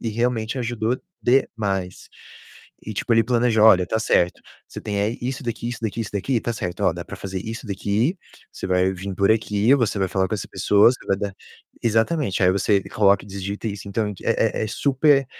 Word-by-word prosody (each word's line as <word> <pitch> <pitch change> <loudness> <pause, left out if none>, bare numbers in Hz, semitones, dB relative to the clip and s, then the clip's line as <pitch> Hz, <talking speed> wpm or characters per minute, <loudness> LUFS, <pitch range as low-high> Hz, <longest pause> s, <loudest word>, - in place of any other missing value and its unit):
E 115 - -3
realmente 115 +1 -1
ajudou 120 0 -1 0.2
demais. 100 -7 0 0.7
E 110 - -7
tipo, 115 - -1
ele 115 - +5
planeja: 120 -3 +2
"Olha, 95 -5 +7
está 110 +5 -1
certo, 90 -5 +1 0.3
você - - -8
tem 100 -1 -3
eh, 100 - +2
aí 115 +3 -2
isso 130 +2 -4
daqui, 120 0 -4
isso 120 - -5
daqui, 110 +1 -2
isso 110 - -4
daqui, 105 +6 -1
está 120 - -1
certo, 90 -6 -4
Ó, - - +3
dá - - -6
para - - -8
fazer 95 -1 -5
isso 115 +3 -7
daqui, 105 - 0 0.4
você - - -6
vai 95 0 +2
vim 95 +1 -6
por 100 +2 +2
aqui, 110 +2 +3
você 115 -6 0
vai 95 - 0
falar 95 0 0
com 110 - -1
essa 105 - -5
pessoa, 105 +3 +4 0.2
vai 100 - +2
dar". 100 -1 -4 0.5
Exatamente, 115 - +1
"aí 90 - +5
você 100 +1 +2
coloca 100 -2 +3
e - - -14
digita 100 +2 -5
isso", 100 0 -7
então 105 +1 -1
é - - +1
é - - +1
é - - -3
super 140 +1 +2
110 Hz, 210 wpm, -22 LUFS, 100-120 Hz, 0.7 s, Olha